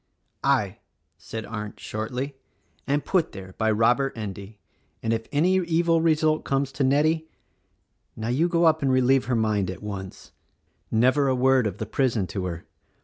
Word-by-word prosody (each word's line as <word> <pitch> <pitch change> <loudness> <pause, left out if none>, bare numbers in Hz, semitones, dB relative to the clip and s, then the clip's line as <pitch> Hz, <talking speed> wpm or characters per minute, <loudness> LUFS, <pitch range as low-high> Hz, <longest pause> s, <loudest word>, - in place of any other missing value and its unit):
"I," - - +1 0.4
said 110 +6 -6
Arndt 105 -1 -6
shortly, 125 +6 -4 0.5
"and 145 +1 0
put 185 -4 +1
there 95 -2 -9
by 110 -1 +2
Robert 120 +5 +2
Endy; 100 0 -7 0.5
and 115 0 +1
if 115 0 -3
any 175 +6 +3
evil 170 -2 +2
result 155 -1 +2
comes 135 0 0
to 135 +1 -1
Nettie 155 +4 +2 0.4
—! - - -47
Now 110 +1 -4
you 145 +8 +2
go 170 -1 +2
up 160 -1 +4
and 135 -1 +2
relieve 130 +1 +3
her 130 - 0
mind, 105 -4 +1
at 95 +2 -7
once. 100 -2 -7 0.6
Never 130 +5 +3
a 130 - +2
word 130 -2 +3
of 100 -1 -5
the 110 - -4
prison 115 -2 0
to 95 -2 -2
her! 85 -2 -5
130 Hz, 170 wpm, -25 LUFS, 110-145 Hz, 0.6 s, up